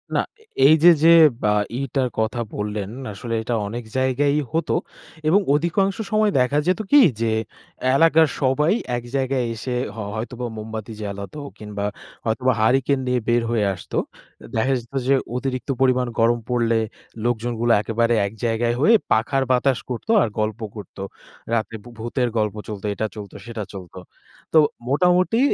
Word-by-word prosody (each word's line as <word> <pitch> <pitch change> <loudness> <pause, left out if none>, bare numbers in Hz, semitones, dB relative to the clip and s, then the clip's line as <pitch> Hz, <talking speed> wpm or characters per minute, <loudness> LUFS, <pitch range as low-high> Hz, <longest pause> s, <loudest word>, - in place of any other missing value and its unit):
না, - - +3 0.2
এ - - -21 0.2
এই 155 - +7
যে, 175 - +10
যে 165 - +8 0.3
বা 105 0 +3 0.3
ইটার 135 -1 -1
কথা 110 +2 -1 0.2
বললেন, 105 -1 -3 0.2
আসলে 115 +4 -6
এটা 120 +2 -1
অনেক 120 +4 -5
জায়গায়ই 140 +3 +2
হত 165 +1 -1 0.6
এবং 180 +6 +5
অধিকাংশ 175 +6 +1
সময় 215 -1 +3
দেখা 125 +3 +2
যেত 185 +2 +2
কি? 290 - +8 0.2
যে 115 -1 +1 0.6
এলাকার 160 +1 +5
সবাই 145 +6 +2 0.2
এক 120 - -6
জায়গায় 130 -2 0
এসে 125 +3 -4 0.2
হয় 105 -3 -5
হ - - -7
হয়তোবা 120 +2 -4
মোমবাতি 110 +1 -6
জ্বালাতো 100 +6 -6 0.2
কিংবা 105 -1 -5 0.4
হয়তোবা 120 +3 +1
হারিকেন 135 +4 +2
নিয়ে 125 0 +1
বের 120 0 +3
হয়ে 110 -3 +1
আসতো। 90 - -6 0.5
এ - - -10
দেখা 115 +5 +2
যেত 120 +2 -16
যে, 135 - +5 0.2
অতিরিক্ত 130 0 -3
পরিমাণ 130 -1 +3
গরম 120 +1 +3
পড়লে 115 -2 +2 0.5
লোকজনগুলো 120 0 0
একেবারে 115 +2 +1
এক 100 - -5
জায়গায় 115 +1 +1
হয়ে 220 - +6 0.2
পাখার 120 +5 +2
বাতাস 130 0 +2
করত 125 - -5
আর - - +2
গল্প 110 +1 -1 0.2
করত। 105 -5 -10 0.6
রাতে 115 0 -1
ভূ 120 - -12
ভূতের 120 +2 -1
গল্প 105 -1 0
চলত, 105 -3 -7
এটা 110 - -2
চলত, 105 -2 -8
সেটা 115 -2 -5
চলত। 95 -3 -10 0.6
তো 160 - +7 0.3
মোটামুটি 180 - +3
120 Hz, 160 wpm, -22 LUFS, 110-135 Hz, 0.6 s, যে